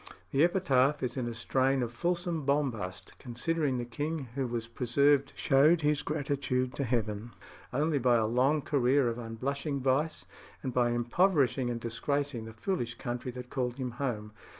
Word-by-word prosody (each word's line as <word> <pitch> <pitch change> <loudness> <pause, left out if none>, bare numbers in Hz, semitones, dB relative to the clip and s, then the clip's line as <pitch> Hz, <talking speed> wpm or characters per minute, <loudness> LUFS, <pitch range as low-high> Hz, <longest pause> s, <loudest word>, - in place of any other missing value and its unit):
The 140 +3 +4
epitaph 150 -6 +3
is 125 - -2
in 125 -3 -2
a 120 - -3
strain 130 +3 +1
of 120 - -3
fulsome 170 +3 -1
bombast, 115 -11 -1
considering 135 +3 -1
the 120 - -3
king 145 +2 -4
who 135 -1 -1
was 115 -1 -3
preserved 140 +4 +2
showed 150 +5 +4
his 150 0 +2
gratitude 140 -4 -1
to 140 - 0
Heaven 115 -2 -2 0.4
only 150 +3 +1
by 125 -1 +4
a 115 -2 +3
long 130 +6 +2
career 135 -1 +3
of 115 +1 -4
unblushing 140 +5 -3
vice, 135 +4 0 0.4
and 130 -2 -3
by 120 -1 +3
impoverishing 125 - +2
and 120 -1 -2
disgracing 120 +2 -2
the 115 - -9
foolish 120 - -2
country 120 +1 -4
that 125 0 -8
called 125 -2 -1
him 130 -2 -3
home. 105 -6 -2
130 Hz, 165 wpm, -30 LUFS, 120-145 Hz, 0.4 s, The